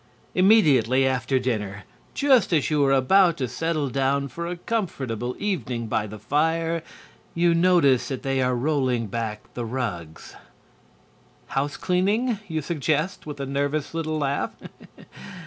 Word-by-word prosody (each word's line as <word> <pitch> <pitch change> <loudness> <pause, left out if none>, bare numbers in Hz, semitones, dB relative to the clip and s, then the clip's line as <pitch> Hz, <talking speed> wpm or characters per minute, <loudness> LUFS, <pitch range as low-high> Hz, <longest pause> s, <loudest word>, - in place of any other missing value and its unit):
Immediately 140 - +4
after 130 0 +1
dinner, 105 -6 -2 0.3
just 265 -7 +3
as 155 -2 +1
you 150 -1 +3
are 135 - +3
about 170 +7 +4
to 130 - -2
settle 155 +4 -1
down 135 +1 0
for 170 +6 -5
a 175 0 -4
comfortable 130 - -3
evening 125 - -2
by 110 -1 -1
the 110 +1 -8
fire, 160 +8 0 0.5
you 170 0 +3
notice 165 -7 +3
that 135 -3 -5
they 135 -1 0
are 125 0 +1
rolling 130 -3 0
back 105 0 -4
the 120 - -4
rugs. 90 -10 -5 1.1
"House 140 +2 -2
cleaning?" 205 +6 +1
you 160 -3 -3
suggest, 155 +3 -1
with 145 -1 -7
a 140 - -3
nervous 140 +2 -2
little 155 -1 -2
laugh. 140 -1 -1
140 Hz, 140 wpm, -24 LUFS, 125-165 Hz, 1.1 s, Immediately